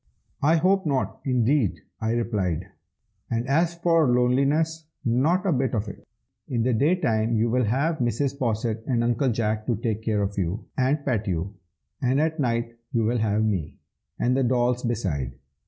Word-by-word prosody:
"I 155 +4 +4
hope 185 +2 +2
not, 135 -3 -1
indeed!" 125 -3 +1 0.2
I 110 +1 0
replied; 105 -8 -1 0.6
"and 115 +2 -1
as 165 +5 +2
for 165 -3 +3
loneliness, 140 +6 +2 0.2
not 145 - +2
a 190 - +2
bit 130 -2 0
of 105 0 -1
it. 100 - -10 0.4
In 120 -3 0
the 125 +1 +2
day 145 +10 +3
time 115 -8 0
you 115 +1 +1
will 125 0 +2
have 145 +9 0
Mrs. 130 +4 -1
Posset 115 -2 -1
and 120 -3 +1
Uncle 120 +3 +1
Jack 110 -2 -1
to 120 - +2
take 110 0 -2
care 110 -2 0
of 100 0 -2
you 95 +5 -2
and 140 +3 +1
pet 115 -6 0
you, 90 +2 -2 0.5
and 130 +2 +2
at 160 +1 0
night 115 -3 -1 0.2
you 115 -4 +1
will 120 +2 +1
have 110 0 +1
me, 95 -8 -2 0.4
and 125 +1 +1
the 135 - +2
dolls 125 0 +1
beside. 90 - -2
120 Hz, 175 wpm, -25 LUFS, 110-140 Hz, 0.6 s, I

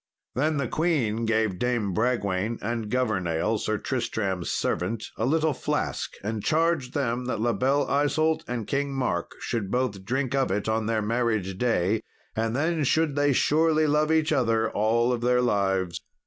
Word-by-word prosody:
Then 150 +4 +1
the 140 -3 -1
queen 120 -9 0
gave 110 -4 +1
Dame 120 -6 0
Bragwaine, 110 -1 0
and 115 -1 -3
Governale, 105 -4 0
Sir 110 +1 -1
Tristram's 105 -8 -2
servant, 105 +6 -1
a 110 - -1
little 160 +1 +2
flask, - - -2
and 105 0 -3
charged 160 -5 +1
them 125 -3 -1
that 125 - -2
La 120 +1 +1
Belle 135 +3 +2
Isault 155 +3 +1
and 120 -3 -3
King 140 +2 -1
Mark 125 -10 -1
should 110 -5 -2
both 110 -5 -1
drink 130 +4 -1
of 135 -7 +1
it 100 +3 -1
on 110 0 0
their 110 -1 0
marriage 110 -4 0
day, 110 -3 +1 0.3
and 115 +1 -1
then 160 +2 +1
should 155 +1 +2
they 145 0 +3
surely 155 +3 +3
love 150 +1 +2
each 160 -1 +2
other 115 -6 +2
all 115 +4 +2
their 125 +1 +2
lives. 95 -7 0
120 Hz, 160 wpm, -26 LUFS, 110-140 Hz, 0.3 s, they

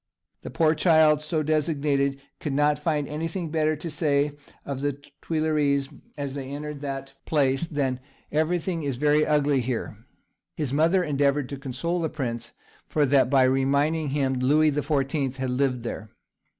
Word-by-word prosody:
The - - -7
poor 160 -1 +3
child 155 -2 +4
so 155 +1 -1
designated 145 -3 +1 0.2
could 145 - -3
not 145 +1 +2
find 150 -4 0
anything 165 +2 -4
better 155 -1 +1
to 155 +2 -6
say 145 -1 +1 0.3
of 135 -1 -4
the 145 0 0 0.3
Tuileries, 150 -4 +1 0.3
as 140 -2 -4
they 135 -2 -5
entered 145 0 -6
that 135 -1 -5
place, 140 +1 +2
than, 135 -5 -1 0.3
"Everything 165 +2 0
is 140 -3 -2
very 150 +3 +3
ugly 145 -2 +2
here." 115 -3 -4 0.5
His 145 -4 -3
mother 165 +5 +3
endeavoured 140 -2 +1
to 140 - -5
console 140 +6 -2
the 160 - -1
prince 120 -6 -4 0.3
for 150 -2 +2
that 135 -1 +3
by 135 -1 +5
reminding 140 +4 +2
him 135 -1 0
Louis 145 +5 +3
the 150 +1 -1
Fourteenth 140 -2 -1
had 130 -1 -2
lived 125 -2 0
there. 110 -2 -5
145 Hz, 160 wpm, -25 LUFS, 135-155 Hz, 0.5 s, by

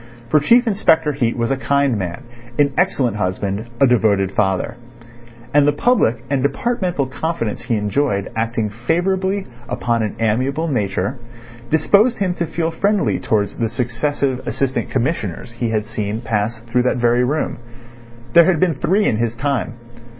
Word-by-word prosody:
For 150 - +5
Chief 235 - +4
Inspector 160 -8 +2
Heat 120 -4 0
was 115 +2 0
a 135 - +1
kind 140 -1 +1
man, 95 +4 -4 0.3
an 140 -1 +3
excellent 130 - +1
husband, 100 +3 -2
a 135 - +6
devoted 105 -6 +2
father; 95 +1 0 0.8
and 145 0 +5
the - - +5
public 140 - +2
and 140 -2 0
departmental 175 - 0
confidence 130 -4 -3
he 115 - 0
enjoyed 105 0 0
acting 115 -1 -1
favourably 190 - 0 0.2
upon 115 -1 0
an 105 -2 -2
amiable 130 +8 0
nature, 105 - -1 0.5
disposed 200 +10 +3
him 190 -3 0
to 170 -1 -3
feel 165 +1 -2
friendly 200 +5 +1
towards 105 -2 -1
the 115 -2 0
successive 125 +3 -1
Assistant 135 -1 -1
Commissioners 120 - -2
he 120 0 -3
had 110 -1 -1
seen 110 0 -3
pass 110 0 -1
through 120 +1 0
that 125 0 +1
very 120 +1 +3
room. 145 -1 -1 0.7
There 170 - +8
had 185 -4 +2
been 180 -1 +3
three 195 +9 +1
in 110 - +1
his 115 0 -1
time. 130 -1 -1
125 Hz, 155 wpm, -19 LUFS, 110-160 Hz, 0.8 s, There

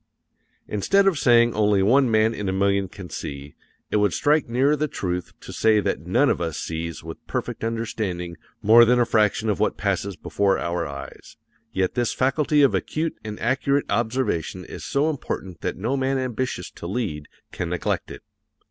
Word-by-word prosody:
Instead 195 - +2
of 185 -7 +2
saying 120 -1 +5
only 105 -2 +3
one 130 +5 +4
man 110 0 +3
in 100 -3 -3
a - - +1
million 100 0 +1
can 95 0 -10
see, 70 -2 -7 0.4
it - - +2
would 105 -3 +2
strike 150 -3 +2
nearer 135 +5 +3
the 150 +1 -1
truth 90 - -3
to - - -10
say 110 -1 +3
that 100 - -1
none 125 +10 +3
of - - +1
us 80 -3 -2
sees 80 0 -5
with 80 0 -9
perfect - - -4
understanding 105 -6 -3 0.3
more 115 +3 +8
than 125 +1 +4
a 120 - +4
fraction 110 0 +2
of 105 -5 0
what - - +1
passes 100 -1 -1
before 95 +3 0
our 85 -1 -2
eyes, 70 -1 -10 0.3
yet 95 -4 0
this 120 -2 0
faculty 145 +3 +2
of 140 - +4
acute 160 +1 -1
and 105 -1 -6
accurate 140 +4 +1
observation 110 -6 -1
is - - -9
so 145 +2 +1
important 95 - -4
that 90 - -3
no 115 +8 -1
man 135 0 0
ambitious 130 -7 -3
to 85 - -8
lead 90 -8 -3 0.2
can 90 - -4
neglect 90 0 -2
it. - - -10
110 Hz, 185 wpm, -24 LUFS, 90-130 Hz, 0.4 s, more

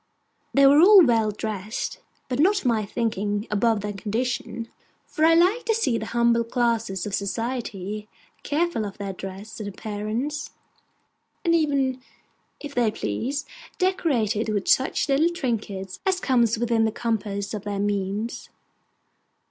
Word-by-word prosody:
They 275 0 +6
were 280 +2 +7
all 385 -1 +9
well 225 -4 +3
dressed, 210 0 -4 0.3
but 255 0 -3
not 380 +7 +5
to 390 -10 -1
my 220 -4 +1
thinking 210 -2 -1
above 215 0 +2
their 205 0 -4
condition; 230 +3 -3 0.4
for 310 - -3
I 330 +1 +6
like 370 +8 +3
to 450 - +2
see 255 - +1
the 220 - -5
humbler 235 0 +2
classes 230 -5 -1
of 205 - -5
society 210 -1 -3 0.3
careful 325 -5 0
of 200 -2 -6
their 200 -2 -4
dress 195 +4 -8
and 205 -1 -4
appearance, 220 +9 -4 0.9
and 335 - +3
even, 275 -5 +1 0.6
if 290 -1 -8
they 240 -4 +2
please, 245 - -3 0.3
decorated 245 - +1
with 205 -3 -1
such 265 - +2
little 290 +4 +3
trinkets 210 - -3
as 380 -1 +1
come 260 -8 +2
within 230 0 +2
the 220 - +1
compass 210 -3 -2
of 210 - -3
their 205 -1 -2
means. 205 +2 -2
230 Hz, 145 wpm, -24 LUFS, 205-275 Hz, 0.9 s, all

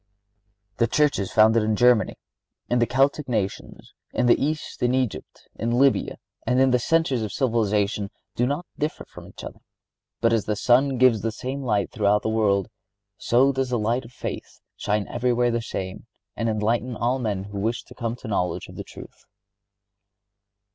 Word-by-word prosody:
The 115 - +3
churches 140 -8 +1
founded 110 +1 +5
in 110 0 +1
Germany, 120 -3 +3 0.5
in 120 - +1
the 120 - +2
Celtic 135 +2 +1
nations, 105 -5 -4 0.2
in - - 0
the 120 - +4
East 155 +2 -3
in 125 +1 +2
Egypt, 130 -5 -3
in 115 - -2
Lybia, 130 +3 +2 0.3
and 125 +1 +1
in 130 0 +4
the 125 - +3
centres 150 -3 +1
of 105 -2 -3
civilization, 105 -4 0 0.3
do 120 - +1
not 145 +6 -2
differ 150 +1 -3
from - - -13
each - - -12
other; - - -8 0.6
but 115 0 +2
as 110 -3 +1
the 105 - -1
sun 130 +5 +3
gives 120 -4 +4
the 115 +2 -1
same 130 +5 -5
light 105 -6 0
throughout 105 0 +2
the - - 0
world, 105 -3 +1 0.5
so 130 +4 +3
does 135 -1 -1
the 125 - 0
light 115 +4 0
of 115 - -13
faith - - -7 0.2
shine 105 -1 -1
everywhere 120 0 +1
the 115 0 -1
same 95 -1 -6 0.3
and 115 0 -1
enlighten 115 +3 0
all 120 +4 0
men 105 -6 -2
who 100 0 -7
wish 115 +4 -1
to - - -15
come 115 -1 -3
to - - -21
the 120 - -6
knowledge 90 -3 -2
of - - -12
the - - -5
truth." - - -13
120 Hz, 180 wpm, -24 LUFS, 105-130 Hz, 0.6 s, founded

